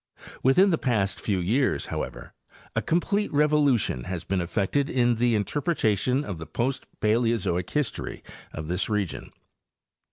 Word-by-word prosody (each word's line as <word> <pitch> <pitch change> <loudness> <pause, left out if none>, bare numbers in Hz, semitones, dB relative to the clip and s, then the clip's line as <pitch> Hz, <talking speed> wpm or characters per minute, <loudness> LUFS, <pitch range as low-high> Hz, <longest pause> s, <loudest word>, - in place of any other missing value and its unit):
Within 185 +10 +5
the 165 - +1
past 105 -7 0
few 100 -3 0
years, 115 +10 +1
however, - - -5 0.4
a - - +2
complete 200 +5 0
revolution 145 - +2
has 90 -2 -4
been 95 -1 -1
effected 105 - 0
in 120 -5 +2
the 120 0 +2
interpretation 130 - 0
of 95 -5 -5
the 80 - -7
post 120 - -2
Paleozoic 110 -5 +1
history 150 -5 -3 0.3
of 75 0 -6
this 90 +5 -1
region. 105 -5 -2
115 Hz, 135 wpm, -26 LUFS, 95-140 Hz, 0.4 s, Within